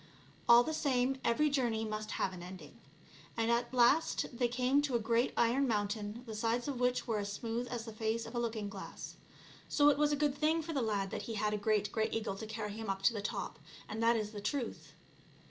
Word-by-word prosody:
All 235 Hz, +1 st, +9 dB
the 315 Hz, -, -3 dB
same, 265 Hz, -3 st, +1 dB
every 300 Hz, +6 st, +3 dB
journey 235 Hz, -5 st, +1 dB
must 215 Hz, 0 st, -4 dB
have 190 Hz, -, -1 dB
an 180 Hz, -, -8 dB
ending. 180 Hz, +1 st, -10 dB, 0.6 s
And 225 Hz, 0 st, +2 dB
at 235 Hz, 0 st, +1 dB
last 255 Hz, +6 st, +3 dB
they 245 Hz, 0 st, +2 dB
came 255 Hz, +3 st, +2 dB
to 285 Hz, -4 st, -1 dB
a -, -, +3 dB
great 230 Hz, +2 st, +1 dB
iron 250 Hz, +4 st, +3 dB
mountain 210 Hz, +1 st, -2 dB
the 225 Hz, -, -7 dB
sides 230 Hz, +3 st, 0 dB
of 275 Hz, -4 st, -3 dB
which 250 Hz, 0 st, +1 dB
were 225 Hz, -3 st, 0 dB
as 200 Hz, 0 st, -3 dB
smooth 230 Hz, +3 st, -3 dB
as 235 Hz, -2 st, -4 dB
the 225 Hz, -, -7 dB
face 220 Hz, +1 st, -1 dB
of 230 Hz, -, -9 dB
a 240 Hz, -, -1 dB
looking 225 Hz, -3 st, -2 dB
glass; 200 Hz, -1 st, -8 dB, 0.5 s
so 290 Hz, -1 st, +5 dB
it 285 Hz, -1 st, +2 dB
was 295 Hz, 0 st, +3 dB
a -, -, +3 dB
good 290 Hz, -1 st, +1 dB
thing 315 Hz, +2 st, +1 dB
for 325 Hz, +1 st, -5 dB
the 275 Hz, -, 0 dB
lad 205 Hz, -4 st, -1 dB
that -, -, -3 dB
he 225 Hz, -, -3 dB
had 210 Hz, 0 st, 0 dB
a -, -, +2 dB
great 210 Hz, 0 st, +1 dB
grey 220 Hz, -1 st, 0 dB
eagle 220 Hz, -3 st, -2 dB
to 220 Hz, -, -6 dB
carry 215 Hz, -1 st, -4 dB
him 220 Hz, -1 st, -6 dB
up 195 Hz, 0 st, -2 dB
to 230 Hz, -, +5 dB
the 210 Hz, -, -3 dB
top, 205 Hz, -, -4 dB, 0.3 s
and 220 Hz, +1 st, -4 dB
that 230 Hz, +1 st, +4 dB
is 210 Hz, -1 st, -3 dB
the 210 Hz, -2 st, -7 dB
truth. 240 Hz, +5 st, -3 dB
230 Hz, 235 wpm, -34 LUFS, 215-250 Hz, 0.6 s, All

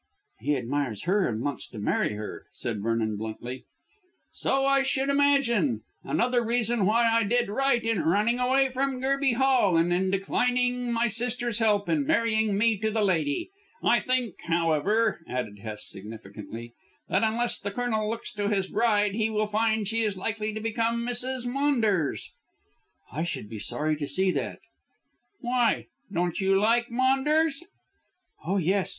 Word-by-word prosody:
"He 150 Hz, -, 0 dB
admires 130 Hz, -4 st, -2 dB
her 195 Hz, +1 st, +2 dB
and 110 Hz, 0 st, -3 dB
wants 145 Hz, -3 st, -3 dB
to -, -, -12 dB
marry 105 Hz, 0 st, 0 dB
her," 105 Hz, 0 st, -7 dB
said 110 Hz, -4 st, -4 dB
Vernon 110 Hz, -1 st, -1 dB
bluntly. 120 Hz, +4 st, -6 dB, 0.7 s
"So 270 Hz, 0 st, 0 dB
I 275 Hz, 0 st, +4 dB
should 270 Hz, 0 st, 0 dB
imagine. 250 Hz, -, +2 dB, 0.2 s
Another 245 Hz, 0 st, +1 dB
reason 230 Hz, -3 st, +1 dB
why 230 Hz, +2 st, +3 dB
I 230 Hz, 0 st, +3 dB
did 235 Hz, +1 st, +1 dB
right 240 Hz, +1 st, +1 dB
in 225 Hz, -5 st, 0 dB
running 210 Hz, +9 st, +2 dB
away 265 Hz, +2 st, +3 dB
from 265 Hz, 0 st, -1 dB
Gerby 270 Hz, 0 st, +1 dB
Hall 250 Hz, -9 st, +3 dB
and 170 Hz, +1 st, +2 dB
in 190 Hz, +1 st, +1 dB
declining 245 Hz, +5 st, 0 dB
my 235 Hz, 0 st, +1 dB
sister's 240 Hz, 0 st, -1 dB
help 210 Hz, -3 st, +2 dB
in 290 Hz, -3 st, 0 dB
marrying 220 Hz, -8 st, +2 dB
me 225 Hz, 0 st, +3 dB
to 220 Hz, +1 st, 0 dB
the 215 Hz, 0 st, 0 dB
lady. 160 Hz, -, 0 dB, 0.3 s
I 240 Hz, -, +4 dB
think, 250 Hz, -5 st, -1 dB
however," 170 Hz, +6 st, +1 dB
added 115 Hz, -5 st, -4 dB
Hest 105 Hz, 0 st, -6 dB
significantly, 110 Hz, +3 st, -9 dB, 0.3 s
"that 190 Hz, -, +1 dB
unless 235 Hz, +2 st, +1 dB
the 200 Hz, -, -3 dB
Colonel 220 Hz, -1 st, -1 dB
looks 230 Hz, +1 st, -5 dB
to 205 Hz, -1 st, -1 dB
his 195 Hz, -2 st, +1 dB
bride 210 Hz, -1 st, +1 dB
he 220 Hz, +1 st, 0 dB
will 215 Hz, -1 st, 0 dB
find 220 Hz, 0 st, 0 dB
she 225 Hz, +2 st, 0 dB
is 210 Hz, -3 st, -1 dB
likely 215 Hz, +2 st, -2 dB
to 215 Hz, -, -5 dB
become 230 Hz, +1 st, -1 dB
Mrs. 245 Hz, +1 st, 0 dB
Maunders." 240 Hz, -, 0 dB, 0.8 s
"I 150 Hz, -, -3 dB
should 170 Hz, -10 st, -3 dB
be 110 Hz, -, -6 dB
sorry 155 Hz, +9 st, -1 dB
to 145 Hz, -1 st, -4 dB
see 190 Hz, +3 st, +1 dB
that." -, -, -4 dB, 0.8 s
"Why? 245 Hz, -2 st, +1 dB, 0.3 s
Don't 175 Hz, 0 st, -1 dB
you 195 Hz, 0 st, +3 dB
like 235 Hz, +3 st, +2 dB
Maunders?" 275 Hz, +5 st, +2 dB, 0.8 s
"Oh, 185 Hz, +5 st, 0 dB
yes. 190 Hz, +2 st, +1 dB
220 Hz, 160 wpm, -27 LUFS, 170-245 Hz, 0.8 s, I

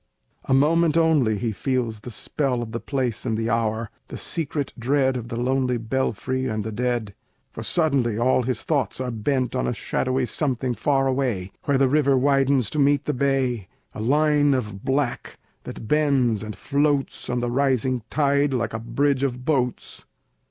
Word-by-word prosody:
A -, -, +1 dB
moment 165 Hz, +3 st, +3 dB
only 150 Hz, -10 st, +3 dB
he 115 Hz, +2 st, -1 dB
feels 120 Hz, 0 st, -2 dB
the 115 Hz, -, -9 dB
spell 125 Hz, +1 st, -2 dB
Of 110 Hz, -, -8 dB
the 115 Hz, -, -3 dB
place 125 Hz, -1 st, -2 dB
and 110 Hz, -3 st, -1 dB
the 115 Hz, +1 st, -1 dB
hour, 115 Hz, -1 st, -1 dB, 0.2 s
the -, -, -7 dB
secret 145 Hz, -3 st, -2 dB
dread 130 Hz, +2 st, +2 dB
Of 120 Hz, -2 st, -4 dB
the 115 Hz, -, -5 dB
lonely 125 Hz, +1 st, 0 dB
belfry 130 Hz, +2 st, -2 dB
and 110 Hz, -3 st, -2 dB
the 110 Hz, -, -4 dB
dead; 120 Hz, -2 st, -2 dB, 0.4 s
For -, -, -7 dB
suddenly 135 Hz, -9 st, +1 dB
all 130 Hz, +2 st, +3 dB
his 125 Hz, -2 st, -2 dB
thoughts 145 Hz, -6 st, -1 dB
are 130 Hz, -1 st, -2 dB
bent 125 Hz, +3 st, -1 dB
On 125 Hz, -, 0 dB
a -, -, 0 dB
shadowy 130 Hz, +4 st, -1 dB
something 130 Hz, -2 st, -1 dB
far 135 Hz, +2 st, +1 dB
away, 125 Hz, -9 st, -1 dB
Where 140 Hz, -2 st, +2 dB
the 135 Hz, 0 st, +4 dB
river 140 Hz, -1 st, +3 dB
widens 135 Hz, -3 st, +2 dB
to 150 Hz, -, -2 dB
meet 140 Hz, 0 st, +3 dB
the 150 Hz, -, 0 dB
bay, 130 Hz, -6 st, 0 dB, 0.3 s
A -, -, -6 dB
line 145 Hz, +3 st, +3 dB
of 105 Hz, -6 st, -4 dB
black, 135 Hz, -2 st, -1 dB, 0.3 s
that 110 Hz, -, -8 dB
bends 135 Hz, -7 st, +2 dB
and 105 Hz, -1 st, -6 dB
floats 140 Hz, +4 st, 0 dB
On 125 Hz, 0 st, 0 dB
the 120 Hz, 0 st, -2 dB
rising 130 Hz, -1 st, +1 dB
tide, 140 Hz, -2 st, +2 dB
like 115 Hz, -2 st, -1 dB
a 110 Hz, -, -3 dB
bridge 140 Hz, +4 st, 0 dB
of 125 Hz, -2 st, -2 dB
boats. 130 Hz, -5 st, -1 dB
130 Hz, 180 wpm, -24 LUFS, 115-140 Hz, 0.4 s, the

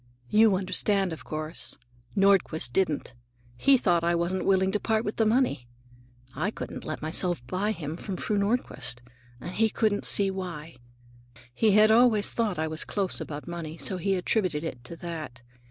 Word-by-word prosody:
You 215 Hz, -2 st, +5 dB
understand, 195 Hz, 0 st, +2 dB
of 150 Hz, -5 st, -9 dB
course. 155 Hz, +1 st, -4 dB, 0.4 s
Nordquist 190 Hz, -10 st, +2 dB
didn't. 160 Hz, -9 st, 0 dB, 0.4 s
He 270 Hz, -, +4 dB
thought 175 Hz, -8 st, +1 dB
I 170 Hz, 0 st, +2 dB
wasn't 175 Hz, +2 st, -1 dB
willing 190 Hz, -1 st, +3 dB
to 210 Hz, -, 0 dB
part 220 Hz, +1 st, 0 dB
with 210 Hz, -, -4 dB
the 225 Hz, -, +3 dB
money. 230 Hz, -, +1 dB, 0.7 s
I -, -, -1 dB
couldn't -, -, -7 dB
let -, -, -5 dB
myself 160 Hz, -3 st, -1 dB
buy 190 Hz, -, -1 dB
him 160 Hz, -5 st, -5 dB
from 190 Hz, 0 st, -5 dB
Fru 210 Hz, -, -2 dB
Nordquist, 200 Hz, -, -1 dB, 0.4 s
and 175 Hz, -, -7 dB
he 220 Hz, +3 st, +2 dB
couldn't 215 Hz, -2 st, 0 dB
see 195 Hz, -1 st, +3 dB
why. 170 Hz, -6 st, -7 dB, 0.8 s
He 215 Hz, -, +3 dB
had 215 Hz, +1 st, +6 dB
always 225 Hz, -2 st, +4 dB
thought 220 Hz, -6 st, -1 dB
I 160 Hz, 0 st, -1 dB
was 155 Hz, 0 st, -2 dB
close 195 Hz, -3 st, 0 dB
about 150 Hz, +1 st, -7 dB
money, 170 Hz, -2 st, -6 dB
so 190 Hz, +3 st, 0 dB
he 195 Hz, +2 st, 0 dB
attributed 180 Hz, -4 st, 0 dB
it 125 Hz, -7 st, -6 dB
to 170 Hz, -, -8 dB
that. 155 Hz, -8 st, -7 dB
185 Hz, 170 wpm, -27 LUFS, 160-210 Hz, 0.8 s, had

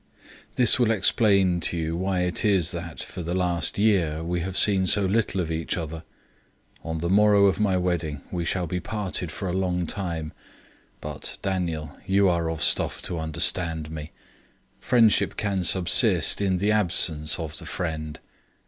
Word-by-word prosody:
This 125 Hz, 0 st, +5 dB
will 120 Hz, -3 st, +3 dB
explain 100 Hz, -3 st, +3 dB
to 85 Hz, -, 0 dB
you 80 Hz, 0 st, -2 dB
why 95 Hz, +1 st, -1 dB
it 90 Hz, -2 st, +1 dB
is 95 Hz, -5 st, +2 dB
that, 85 Hz, -2 st, -6 dB
for 90 Hz, -, -8 dB
the 85 Hz, +2 st, -3 dB
last 90 Hz, -2 st, -1 dB
year, 90 Hz, -7 st, +1 dB
we 85 Hz, +1 st, -2 dB
have 90 Hz, +2 st, -3 dB
seen 95 Hz, -3 st, +4 dB
so 100 Hz, +2 st, +3 dB
little 100 Hz, 0 st, 0 dB
of 85 Hz, -2 st, -2 dB
each 80 Hz, +2 st, -2 dB
other. 80 Hz, -1 st, -5 dB, 0.8 s
On 80 Hz, 0 st, -4 dB
the 85 Hz, +2 st, -3 dB
morrow 100 Hz, +1 st, +5 dB
of 100 Hz, -, +2 dB
my 100 Hz, -3 st, +2 dB
wedding 85 Hz, -5 st, -2 dB
we 90 Hz, -2 st, -2 dB
shall 90 Hz, +1 st, -1 dB
be 90 Hz, +2 st, -3 dB
parted 95 Hz, -4 st, -4 dB
for 95 Hz, -, -5 dB
a 90 Hz, -, -2 dB
long 90 Hz, -2 st, -1 dB
time; 85 Hz, -4 st, -4 dB, 0.7 s
but, -, -, -6 dB
Daniel, 85 Hz, -6 st, -3 dB
you 100 Hz, +1 st, +3 dB
are 85 Hz, -2 st, 0 dB
of 80 Hz, -1 st, -2 dB
stuff -, -, +1 dB
to 85 Hz, -, -4 dB
understand 80 Hz, 0 st, -2 dB
me. 75 Hz, -1 st, -7 dB, 0.7 s
Friendship 115 Hz, -3 st, +3 dB
can 100 Hz, -3 st, -1 dB
subsist 90 Hz, +2 st, +2 dB
in 95 Hz, -2 st, +1 dB
the 100 Hz, +4 st, +1 dB
absence 85 Hz, -7 st, +1 dB
of 80 Hz, -3 st, -5 dB
the -, -, -10 dB
friend. 80 Hz, -3 st, -4 dB
90 Hz, 170 wpm, -25 LUFS, 80-95 Hz, 0.8 s, This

